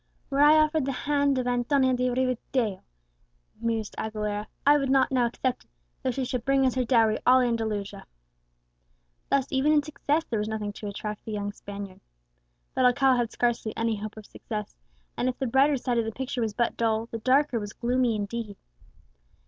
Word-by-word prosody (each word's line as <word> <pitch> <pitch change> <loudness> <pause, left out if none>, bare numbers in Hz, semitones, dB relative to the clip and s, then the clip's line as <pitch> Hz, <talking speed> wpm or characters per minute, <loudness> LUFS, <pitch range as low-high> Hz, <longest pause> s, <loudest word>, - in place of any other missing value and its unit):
"Were 275 +1 +2
I 300 +1 +7
offered 310 -2 +2
the - - +1
hand 285 -2 +2
of 255 - -1
Antonia 255 +2 +2
de 250 0 +1
Rivadeo," 250 -4 -1 0.8
mused 225 -2 -2
Aguilera, 210 -1 -3 0.2
"I 290 +1 +6
would 275 -1 -1
not 270 0 +3
now 250 -2 +3
accept 250 +2 -3
it, - - -39 0.3
though - - -1
she 255 +1 -2
should 250 -1 -3
bring 270 0 +3
as 255 - +2
her 255 - 0
dowry 225 -3 +3
all 255 +1 +6
Andalusia!" 220 -5 -2 1.2
Thus 275 -1 +1
even 270 +3 +2
in 300 -1 +4
success 305 +1 -1
there 225 - -2
was 210 - -2
nothing 210 -2 -3
to 210 - -7
attract 210 +1 -5
the 220 - -7
young 205 -1 -3
Spaniard. 200 -2 -9 0.7
But 255 - +2
Alcala 255 +1 +4
had 240 -2 -1
scarcely 235 -2 -1
any 225 -1 0
hope 215 +1 -7
of 215 - -10
success; 210 -2 -6 0.4
and 255 - 0
if 255 - -4
the 270 - -2
brighter 270 +4 +3
side 245 -1 0
of 230 - 0
the 225 - -3
picture 255 +1 -4
was 220 -2 -2
but 235 -1 0
dull, 225 -1 +1
the 230 -1 -6
darker 260 +1 +2
was 205 -1 -6
gloomy 245 0 0
indeed. 210 0 -4
245 Hz, 190 wpm, -27 LUFS, 220-265 Hz, 1.2 s, I